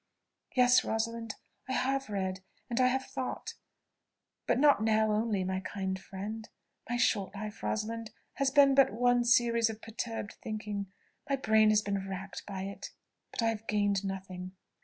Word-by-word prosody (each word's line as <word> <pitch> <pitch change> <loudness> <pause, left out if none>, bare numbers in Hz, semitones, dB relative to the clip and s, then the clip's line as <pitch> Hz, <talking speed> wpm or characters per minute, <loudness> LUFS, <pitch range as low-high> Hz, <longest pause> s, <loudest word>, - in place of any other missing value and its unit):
"Yes, 250 0 +6
Rosalind, 225 0 -2 0.3
I - - 0
have 270 0 0
read, 190 -2 -2 0.3
and 240 +2 +2
I 255 - +6
have 265 +1 0
thought 265 -1 -4 0.9
but - - +3
not 285 -4 +5
now 220 0 +3
only, 210 -2 +1
my 185 0 -1
kind 190 0 -3
friend. 210 +4 -6 0.4
My 240 - 0
short 205 -5 +1
life, 210 +1 -6
Rosalind, 225 +1 -2 0.3
has 275 0 +2
been 275 0 +6
but 270 -6 +5
one 245 +2 +3
series 235 -1 +4
of 220 -1 -6
perturbed 225 -1 -5
thinking 210 -3 -4 0.4
my 275 - +3
brain 220 -4 +4
has 215 0 +4
been 200 -1 -2
racked 195 +2 -6
by 195 -2 -4
it. 195 0 -6 0.4
But 240 - -3
I 230 - +3
have 225 0 -4
gained 205 -1 +1
nothing." 185 -1 -5
220 Hz, 160 wpm, -31 LUFS, 200-240 Hz, 0.9 s, Yes